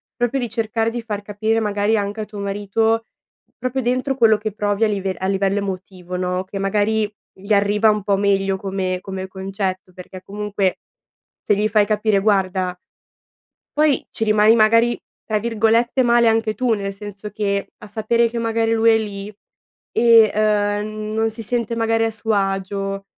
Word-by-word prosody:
proprio 245 +2 0
di 245 - -2
cercare 225 0 -1
di 240 0 -4
far 210 -3 -5
capire 215 +2 -1
magari 210 +1 +1
anche 205 +1 -3
a - - -4
tuo 210 -1 -9
marito, 205 +3 0 0.5
proprio 255 +1 -2
dentro 255 +3 0
quello 225 -4 +4
che 215 0 -4
provi 205 +1 0
a - - +5
live 195 -3 -2
a 190 - -4
livello 195 +1 +1
emotivo, 185 -2 -6
no, 180 0 -1
che 195 +1 -7
magari, 210 +2 +1 0.3
gli 200 +2 -1
arriva 205 +2 +3
un 210 -2 +1
po' 200 -1 +1
meglio 195 -1 +1
come 190 -1 -2
come 190 -1 -6
concetto, 190 -1 -4
perché 185 0 -10
comunque, 200 -1 -2 0.6
se 205 - +2
gli 210 +2 +1
fai 210 -1 +3
capire: 210 -1 +1
"Guarda" 190 -3 +1 1.0
poi 300 -3 +2
ci 225 - -2
rimani 215 +1 +5
magari, 230 +2 +4 0.3
tra 215 -1 0
virgolette, 230 +3 +1
"male" 235 -2 +4
anche 225 -1 +1
tu 250 0 0
nel 195 -1 -4
senso 205 0 -8
che, 200 -1 -2
a 210 - -11
sapere 230 +2 +1
che 235 - -5
magari 225 0 0
lui 230 0 +4
è 225 - +4
lì 200 -2 -5 0.7
e, 230 -2 +6
ehm, 210 0 0
non 225 0 +1
si 225 +1 -6
sente 235 0 -2
magari 225 0 +1
a 225 - +1
suo 220 0 -3
agio, 195 0 -2
210 Hz, 175 wpm, -20 LUFS, 195-225 Hz, 1.0 s, e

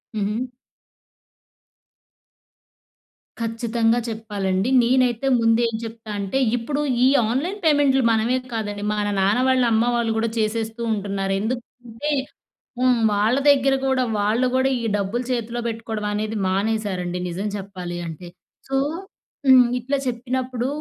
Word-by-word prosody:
హుహు. 215 +4 -1 2.9
ఖచ్చితంగా! 230 0 +1
చెప్పాలండి. 205 -2 -2
నేనైతే 250 +1 +2
ముందు 225 0 +3
ఏం 230 - -3
చెప్తా 225 -1 -8
అంటే, 200 +6 -2 0.2
ఇప్పుడు 280 +5 -2 0.2
ఈ - - +6 0.2
ఆన్లైన్ 335 - -2
పేమెంట్‌లు, 285 -4 +4
మనమే 225 +3 +2 0.2
కాదండి! 205 -2 -3
మన 210 -1 -1
నాన్న 200 +5 +3
వాళ్ళ, 260 -1 +3
అమ్మ 220 +1 +3
వాళ్ళు 235 -1 0
కూడా, 225 0 0
చేసేస్తూ 220 +1 -2
ఉంటున్నారు. 195 -1 -2
ఎందుకంటే 240 +3 -5 0.7
హ్మ్. 250 -2 +3
వాళ్ళ 210 +4 +2
దగ్గర 275 -1 +4
కూడా 265 -1 +2 0.2
వాళ్ళు 215 +5 +2
కూడా, 260 +1 +3
ఈ - - -4
డబ్బులు 205 +5 -2
చేతిలో 240 -1 -2
పెట్టుకోవడం 225 -2 -4
అనేది, 215 +1 -2
మానేశారండి, 190 -3 -1
నిజం 185 +4 -4
చెప్పాలి 185 -3 -6
అంటే. 165 +2 -8 0.4
సో 270 - -1 0.7
హ్మ్, 255 -2 +8
ఇట్లా 270 +4 -1
చెప్పినప్పుడు, 250 0 -2
225 Hz, 120 wpm, -22 LUFS, 210-250 Hz, 2.9 s, హ్మ్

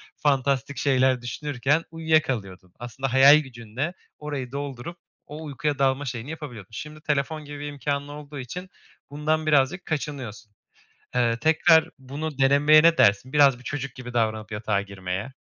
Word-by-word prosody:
fantastik 140 -2 0
şeyler 130 -2 +2
düşünürken 145 +4 -1
uyuyakalıyordun. 130 - -1
Aslında 120 +2 -4
hayal 140 +3 +8
gücünle 130 +4 -5 0.3
orayı 140 -4 -5
doldurup 140 +3 -6 0.3
o 155 +2 -8
uykuya 145 0 -2
dalma 135 +1 +1
şeyini 125 +1 -5
yapabiliyordun. 135 - -8
Şimdi 150 +5 -8
telefon 150 +1 -2
gibi 145 0 -8
bir 145 - -5
imkânın 145 0 -3
olduğu 145 -1 -9
için 180 +9 -7 0.4
bundan 155 +2 -1
birazcık 150 +4 +2
kaçınıyorsun. 130 -8 -5 0.6
Eee, 115 -2 +2
tekrar 160 +1 +4
bunu 140 +2 -6
denemeye 145 +3 +5
ne 165 -1 +5
dersin? 105 +7 +3
Biraz 140 -4 +5
bir - - -16
çocuk 140 -1 -5
gibi 125 -1 -8
davranıp 110 -2 -1
yatağa 105 -1 -1
girmeye. 100 +4 -5
140 Hz, 145 wpm, -25 LUFS, 120-150 Hz, 0.6 s, hayal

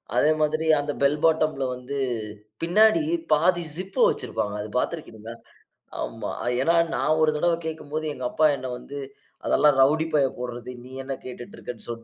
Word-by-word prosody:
அதே 155 - +4
மாரி 155 +1 +1
அந்த 145 0 -2
பெல் 140 +2 +3
பாட்டம்‌ல 155 -3 +2
வந்து 125 +3 -6 0.6
பின்னாடி 215 - +5 0.3
பாதி 175 +3 +3
ஜிப் 185 +2 -7
வச்சிருப்பாங்க. 105 - -2
அது 105 - -6
பார்த்திருக்கிறீங்களா? 115 -7 -4 0.7
ஆமா. - - -4 0.3
ஏன்னா, 165 +5 +3 0.2
நான் 155 +1 +2
ஒரு 155 -1 +4
தடவை 170 +1 +2
கேட்கும்போது 155 0 -4
எங்க 130 -3 -6
அப்பா 155 - +2
என்ன 130 0 -6
வந்து, 140 +3 -8 0.5
"அதெல்லாம் 145 -2 +4
ரவுடி 155 +4 +4
பையன் 140 -3 +2
போடுறது. 125 -1 -6
நீ 130 - -12
என்ன 135 +1 -4
கேட்டுட்டு 125 -1 -9
இருக்க" 115 -1 -7
150 Hz, 150 wpm, -25 LUFS, 125-160 Hz, 0.7 s, பின்னாடி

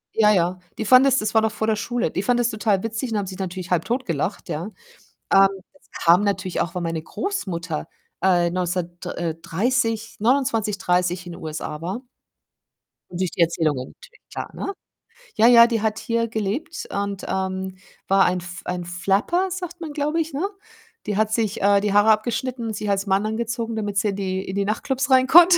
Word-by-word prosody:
ja, 210 -1 +5
ja, 180 -2 +1 0.2
die 220 - -3
fanden 255 +4 +7
das 270 -1 +4
das 215 -2 -1
war 220 - +5
noch 220 0 +1
vor 220 0 -2
der 220 - +3
Schule. 240 +2 -1
Die - - -1
fanden 245 +3 +2
das 240 -1 +2
total 210 -3 0
witzig 225 +2 -3
und 220 - 0
haben 205 - -1
sich 185 0 -8
natürlich 185 -1 -5
halbtot 235 +10 0
gelacht, 165 +3 -2
ja? 160 +3 -3 0.7
Ähm, 195 0 +8 0.3
das 285 - -27
kam 175 +4 +6
natürlich 195 -3 -1
auch, 170 - -2
weil 180 - -2
meine 165 -1 -2
Großmutter 175 - -3 0.4
äh, 175 -2 +4
neundzehnhundertd 175 0 -3
äh, 165 -2 -2
30, 225 +5 0
29, 225 -3 +1
30, 180 -1 0
in 175 - -7
USA 155 -1 -5
war. 190 +8 -4 1.1
Und 175 - -6
durch 185 - 0
die - - -2
Erzählungen 155 -6 +1
natürlich - - -18
klar, - - -5
ne? 395 - -4 0.6
Ja, 225 +1 +5
ja, 235 -1 +9
die 230 -2 -1
hat 220 0 0
hier 230 0 0
gelebt 220 +8 -3
und, 200 -1 -3
ähm, 190 0 -3 0.3
war 195 0 +5
ein 180 0 +1
F 180 0 -8
ein 180 0 -3
Flapper, 200 - 0
sagt 355 -1 -5
man, 310 -3 -5
glaub 295 +1 -1
ich, 325 -2 -1
ne? 280 - -2 0.7
Die 205 -2 -1
hat 215 0 +1
sich 220 -2 0
äh, 200 0 +5
die 205 -1 0
Haare 205 +2 +6
abgeschnitten 235 +2 -1
und 220 - -3
sich 210 0 -3
als 200 0 0
Mann 195 +2 +2
angezogen, 230 +1 -2
damit 205 -2 -3
sie 210 +2 +2
in 200 - -2
die 190 -1 -3
in 190 - -4
die 200 0 0
Nachtclubs 260 +6 -1
rein 260 -1 +6
konnte. 345 +3 +8
205 Hz, 200 wpm, -23 LUFS, 180-230 Hz, 1.1 s, ja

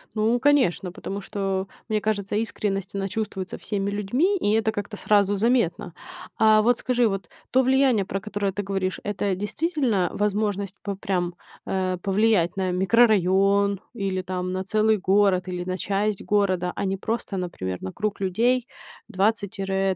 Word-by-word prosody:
Ну, 220 +3 +2
конечно, 235 - +2
потому 195 +2 -6
что, 195 -2 -2 0.2
мне 215 -2 0
кажется, 205 -2 -1
искренность, 205 -3 -2
она 195 0 -1
чувствуется 195 -3 -4
всеми 200 -1 -2
людьми, 245 - +1
и 205 - 0
это 220 0 +2
как-то 210 0 -5
сразу 205 -1 +3
заметно. 200 -6 +1 0.4
А 215 -1 +5
вот 240 +2 +3
скажи, 245 -2 +2
вот 195 -4 -4 0.2
то 260 - +5
влияние, 260 -5 +3
про 195 - -3
которое 205 -1 -2
ты 205 +2 -4
говоришь, 195 -1 -2
это 205 -1 -1
действительно 225 - 0
возможность 205 -1 -1
п 200 -1 -4
прям, 185 -3 -2 0.3
э, 185 -1 -1
повлиять 195 -2 +2
на 185 -1 0
микрорайон 200 -1 +3
или 195 -4 -2
там 185 0 -3
на 185 0 -2
целый 215 +2 +2
город, 190 -1 +2
или 180 -1 -3
на 185 +1 -3
часть 200 +2 -1
города, 185 -4 +1
а - - -2
не 195 0 -1
просто, 220 -1 -3
например, 95 - -4
на 95 - -5
круг 210 -1 -2
людей 235 +6 +1 0.4
20 205 -1 0
тире 195 -2 -1
200 Hz, 160 wpm, -24 LUFS, 190-215 Hz, 0.4 s, А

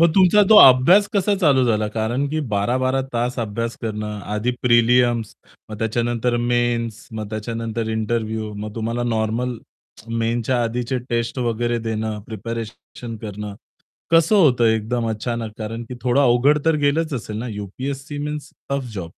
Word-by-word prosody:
मग 170 - +6
तुमचा 195 +2 +6
तो 220 - +9
अभ्यास 135 +11 +7
कसा 200 +1 +2
चालू 135 -6 +4
झाला 110 -2 +1
कारण 120 +6 0
की 155 +1 -2
12-12 130 +6 +1
तास 120 +2 -1
अभ्यास 115 +1 -3
करणं 105 -1 -4 0.2
आधी 110 +4 0
प्रीलिम्स 120 -1 +3 0.4
मग 105 - -7
त्याच्यानंतर 120 +1 0 0.2
मेन्स 120 -2 -1
मग 110 -1 -5
त्याच्यानंतर 115 +1 -4
इंटरव्ह्यू 110 -1 -2
मग 105 +1 -6
तुम्हाला 115 +2 -2
नॉर्मल 115 +3 -1 0.7
मेन्सच्या 120 +2 0
आधीचे 120 +2 -2
टेस्ट 115 +2 -2
वगैरे 120 -1 0
देणं 110 -1 -3
प्रिपेरेशन 115 +1 -7
करणं, 105 -1 -6 0.6
कसं 165 +5 +4
होतं 130 -10 +4
एकदम 115 +1 0
अचानक 110 0 -3
कारण 115 +2 -5
की 125 - -6
थोडं 125 +2 +2
अवघड 135 +3 +4
तर 165 -1 +3
गेलंच 155 +2 +1
असेल 110 -3 -5
ना 120 +2 -4
यूपीएससी 135 +8 -6
मीन्स 150 0 -5 0.2
टफ 135 -4 -2
जॉब. 90 -5 -5
120 Hz, 145 wpm, -21 LUFS, 110-130 Hz, 0.7 s, तो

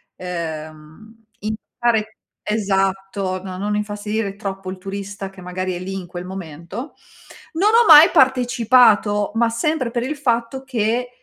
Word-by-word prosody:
ehm, 165 +5 -8
in 215 +1 -3 0.3
dare 220 -2 0 0.3
esatto, 195 -2 -1
no, 185 -1 -6
non 210 +2 -2
infastidire 210 0 -3
troppo 195 -2 -6
il 190 - -7
turista 195 0 -6
che 195 - -16
magari 185 +1 -3
è 175 - -5
lì 190 +1 -6
in 185 -2 -6
quel 175 +1 -7
momento. 185 - -8 0.6
Non 385 +6 +3
ho 460 +1 +5
mai 310 +1 +10
partecipato, 240 -5 +4
ma 230 0 +3
sempre 250 +1 -1
per 240 0 -1
il 290 +4 -3
fatto 240 -1 -1
che, 245 0 -1
205 Hz, 145 wpm, -20 LUFS, 190-235 Hz, 0.6 s, mai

